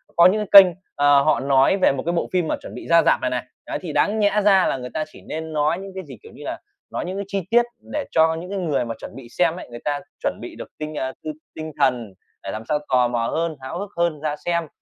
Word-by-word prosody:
có 170 - +7
những 210 +4 +4
cái 200 - +12
kênh, 185 - 0 0.3
ờ, 145 -1 +5
họ 155 0 +2
nói 135 +6 +3
về - - +5
một 135 -1 -3
cái 170 - 0
bộ 170 - 0
phim 180 -3 +1
mà - - 0
chuẩn - - -9
bị - - -8
ra 170 0 +6
rạp - - +3
này 130 - 0
này, 125 -1 -2 0.2
đấy, - - -4
thì 170 -5 -5
đáng 210 +7 +2
nhẽ 210 0 +3
ra 195 -2 +5
là - - 0
người 125 -1 -6
ta 155 - -1
chỉ - - -16
nên 160 0 -6
nói 150 +2 +1
những 195 0 -8
cái 190 - -5
gì, 130 -5 -11
kiểu - - -13
như - - -12
là, - - -4 0.3
nói - - -3
những 185 +2 -4
cái 200 - -3
chi 195 0 -2
tiết 240 +1 +4 0.3
để 300 -1 -1
cho 160 0 +4
những 175 +3 -7
cái 200 0 -3
người 145 -9 0
mà 115 - -4
chuẩn - - -9
bị 135 -3 -10
xem 165 +5 +1
ấy 180 - -9
người 120 0 -8
ta 145 -1 0 0.2
chuẩn - - -1
bị - - -8
được - - -8
tinh, 155 0 -5
a, 130 -1 -2
t - - -26 0.3
tinh 155 0 -6
thần 120 -6 +1 0.3
để 95 - -4
làm 110 - -5
sao 150 - +2
tò 125 -1 +4
mò 120 -1 -1
hơn, 165 +3 -1
háo 130 +6 -5
hức 200 +1 -5
hơn 170 -3 +1
ra 150 -1 -1
xem, 170 -2 0
160 Hz, 290 wpm, -22 LUFS, 135-185 Hz, 0.3 s, cái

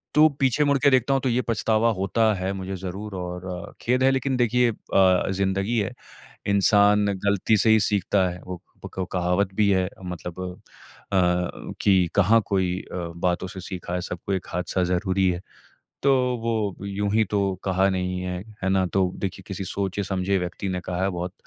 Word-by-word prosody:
तो 155 +1 +8
पीछे 135 +2 +3
मुड़ 140 -1 +3
के 140 - +5
देखता 130 +1 +3
हूँ 135 - +1
तो 130 - 0
ये 125 +2 +2
पछतावा 115 -1 +1
होता 110 +3 +2
है 95 +1 -2
मुझे 95 0 -5
ज़रूर 95 +3 -6
और 90 0 -6
खेद 125 +2 +1
है 135 - +5
लेकिन 135 0 0
देखिए 120 0 +3
अ 95 -3 +2
ज़िंदगी 95 +4 0
है। 100 - -2 0.6
इंसान 100 +1 +4 0.2
गलती 100 +2 +2
से 110 - +3
ही 110 -1 +6
सीखता 100 -2 +1
है। 90 - -8
वो 90 -2 -6 0.3
पक - - -12
कहावत 90 +2 +1
भी 105 -1 +3
है 95 -1 +2 0.2
मतलब 90 0 -6 0.7
अ 90 -1 0
कि 95 -3 +4
कहाँ 105 +3 +5
कोई 95 -2 0
अ - - -4 0.3
बातों 90 +1 0
से 95 -2 -8
सीखा 90 -1 -6
है 90 - -1
सबको 90 +2 -5
एक 95 - -3
हादसा 90 +1 -1
ज़रूरी 95 +1 +1
है। 90 - -3 0.6
तो 140 0 +4 0.3
वो 105 -4 -2
यूँ 100 +1 -2
ही 110 0 +4
तो 105 - +1 0.3
कहा 95 0 +2
नहीं 90 -1 -2
है। 90 -1 -3 0.2
है 95 - 0
न? 95 -1 +2
तो 95 -2 +2
देखिए 95 0 -4
किसी 95 0 -5
सोचे 100 +2 -2
समझे 95 +1 0
व्यक्ति 90 +2 -4
ने 90 -1 -2
कहा 90 0 -3
है 95 - +2
बहुत 90 +1 -4
95 Hz, 185 wpm, -24 LUFS, 90-105 Hz, 0.7 s, तो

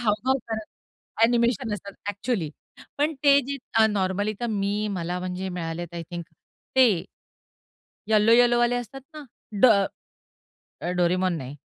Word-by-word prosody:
हावभाव 240 +4 +1
करत 220 -1 -4 0.6
अ‍ॅनिमेशन 235 0 +2
असतात 200 -1 -8
अ‍ॅक्चुअली, 205 -5 -2 0.5
पण 300 +2 +1
ते 280 0 +7
जे 280 0 -3 0.2
अ, 220 -1 +6
नॉर्मली 205 0 0
तर 240 - -1
मी 205 +1 -1
मला 180 -1 -3
म्हणजे 185 +1 -4
मिळालेत 170 -1 -5
आय 170 - -4
थिंक 175 -1 -5 0.5
ते 225 -10 +4 1.0
येलो 215 0 +4
येलोवाले 240 0 +4
असतात 245 +3 -6
ना, 305 -1 -8 0.4
ड - - +9 1.3
डोरेमोन 180 +1 +2
नाही. 135 -1 -7
210 Hz, 130 wpm, -25 LUFS, 180-240 Hz, 1.3 s, ड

